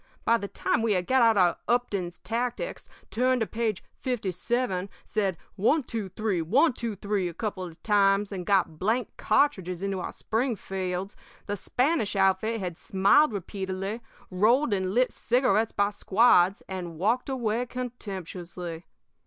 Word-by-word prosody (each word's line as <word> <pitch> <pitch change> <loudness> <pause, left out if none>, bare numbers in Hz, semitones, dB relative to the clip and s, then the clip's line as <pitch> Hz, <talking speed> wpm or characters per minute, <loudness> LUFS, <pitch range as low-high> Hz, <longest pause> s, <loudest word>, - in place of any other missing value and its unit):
"By 230 - +4
the 200 - -4
time - - 0
we 225 -2 +2
had 180 -2 0
got 260 +4 +3
out 225 -2 +5
our 180 -2 +4
'Upton's 200 -8 0
Tactics,' 245 - -3 0.2
turned 255 +1 +2
to - - +2
page 220 -3 -2 0.2
fifty 245 -7 -2
seven, 200 -1 -1
said 195 -5 -1 0.2
'one 235 +10 +2
two 225 -5 -4
three 195 -2 -1
one 255 - +3
two 230 -3 -4
three' 200 -1 -1
a 170 - -7
couple 205 -2 -3
of 170 -3 -10
times, 200 -1 +3
and 190 -2 -4
got 180 -5 +1
blank 225 +4 0
cartridges 190 -7 +1
into 195 -1 -1
our - - -4
Springfields, 195 -5 -2 0.3
the 205 - -2
Spanish 250 - 0
outfit 195 +4 +2
had 180 -4 -4
smiled 200 +12 +4
repeatedly, 195 +2 -4 0.3
rolled 225 +7 +3
and 190 0 -1
lit 250 +1 +3
cigarettes 240 -2 +2
by 200 0 +1
squads, 200 -2 +4
and 175 -4 -6
walked 225 - +1
away 245 -2 -1
contemptuously. 185 -8 -6
205 Hz, 155 wpm, -27 LUFS, 185-235 Hz, 0.3 s, out